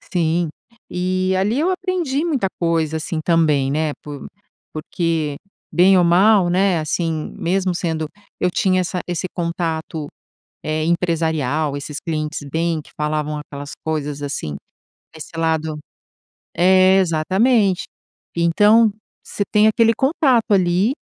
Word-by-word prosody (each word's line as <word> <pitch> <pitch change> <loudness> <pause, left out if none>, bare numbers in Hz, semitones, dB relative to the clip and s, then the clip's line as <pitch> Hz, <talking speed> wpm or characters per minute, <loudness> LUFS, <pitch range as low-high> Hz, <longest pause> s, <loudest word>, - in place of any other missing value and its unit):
Sim. 170 -1 0 0.4
Eh, 185 +1 0
ali 210 +7 +1
eu 350 - +2
aprendi 355 -6 -1
muita 280 - 0
coisa, 165 -2 0
assim 155 0 -3
também, 155 -5 +2
né, 155 0 0
por 145 -2 -8 0.5
porque 155 -1 -2 0.4
bem 185 +2 +5
ou 175 - +4
mal, 185 +2 +4
né, 185 0 +2
assim, 160 0 -2
mesmo 185 +1 0
sendo 160 -2 -2 0.3
eu 180 - +2
tinha 185 +1 +1
essa 180 0 -2
esse 175 0 -2
contato, 165 -3 -3 0.6
eh, 155 0 -1
empresarial, 160 -4 0
esses 145 +1 -6
clientes 155 -1 -3
bem 165 -1 0
que - - -20
falavam 150 0 -2
aquelas 145 -1 -8
coisas 150 -2 -3
assim, 140 - -4 0.6
desse 160 +1 -10
lado 160 -1 -1 0.8
é, 185 +1 +5
exatamente. 190 +4 +2 0.5
Então, 210 +6 +4 0.3
você - - -4
tem 210 +1 +5
aquele 230 +1 +4
contato 265 -3 +2
ali 185 +4 +3
170 Hz, 125 wpm, -20 LUFS, 155-190 Hz, 0.8 s, bem